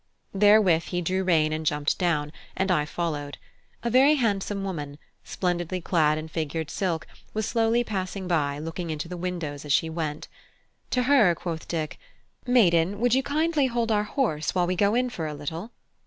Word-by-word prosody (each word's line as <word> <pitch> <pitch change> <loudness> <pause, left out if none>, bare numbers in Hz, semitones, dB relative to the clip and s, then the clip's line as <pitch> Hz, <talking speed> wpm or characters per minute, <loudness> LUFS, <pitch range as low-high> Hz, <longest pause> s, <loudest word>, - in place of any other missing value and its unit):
Therewith 195 -5 +5
he 175 - -2
drew 185 +2 -1
rein 160 -4 +2
and 155 0 -3
jumped 150 -1 0
down, 150 -5 0 0.3
and 190 0 +1
I 150 -4 +2
followed. 150 -3 -3 0.5
A 235 - -1
very 270 +5 +6
handsome 205 -5 -1
woman, 150 -7 -5 0.3
splendidly 180 0 -2
clad 155 -4 +2
in 155 +1 -5
figured 160 -1 -3
silk, 170 -5 -2 0.3
was 215 -1 0
slowly 230 +1 +2
passing 190 -3 -4
by, 145 -5 0
looking 165 +3 -5
into 155 0 -3
the 180 - -6
windows 170 -5 -4
as 150 - -5
she 160 +1 +2
went. 155 -2 -4 0.6
To 250 - +1
her 245 -10 +5
quoth 165 -1 -5
Dick: 155 -3 -3 0.5
"Maiden, 195 -6 +3
would 240 0 +2
you 265 - +4
kindly 300 0 +1
hold 235 -2 -1
our 210 -1 +2
horse 205 - -1
while 180 -1 +3
we 180 +1 -1
go 200 +4 +2
in 250 0 +1
for 165 -9 -4
a 150 - -5
little?" 160 +8 -5
180 Hz, 180 wpm, -26 LUFS, 155-210 Hz, 0.6 s, very